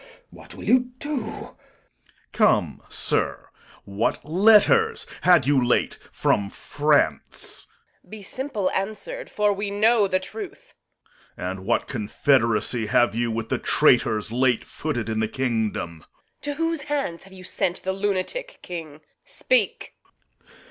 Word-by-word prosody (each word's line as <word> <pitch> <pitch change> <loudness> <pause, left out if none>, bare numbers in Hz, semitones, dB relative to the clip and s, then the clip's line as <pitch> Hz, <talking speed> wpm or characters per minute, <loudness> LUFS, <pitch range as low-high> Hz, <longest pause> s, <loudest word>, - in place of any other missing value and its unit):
What - - -13
will - - -10
you 250 0 +2
do? 290 - -6 0.2
Corn. - - -9 0.8
Come, - - +2
sir, - - +1 0.4
what 100 +6 -2
letters 220 - +4 0.2
had 175 -8 +5
you 135 -2 +3
late 120 - +1
from 100 -1 0
France? 145 - 0 0.4
Reg. - - -27
Be 215 0 -9
simple 250 -3 -2
answer'd, 220 - -4
for 210 -1 +1
we 200 +1 -3
know 210 +1 +3
the 185 0 +1
truth. 215 +3 -9 0.6
Corn. 90 +1 -3
And 95 - -12
what 120 - +1
confederacy 115 0 +1
have 120 -2 +3
you 120 +1 -1
with 115 0 -3
the - - 0
traitors 110 0 +2
Late 120 -1 +2
footed 135 -6 -4
in 110 -1 -2
the 110 - +1
kingdom? 110 -9 -2
Reg. - - -23 0.3
To 290 - -3
whose 330 0 -1
hands 280 - -3
have 190 0 -16
you 185 -1 -12
sent 180 -1 -2
the 190 - -1
lunatic 205 - -2
King? 160 -4 -8 0.2
Speak. - - 0
175 Hz, 140 wpm, -24 LUFS, -, 0.8 s, had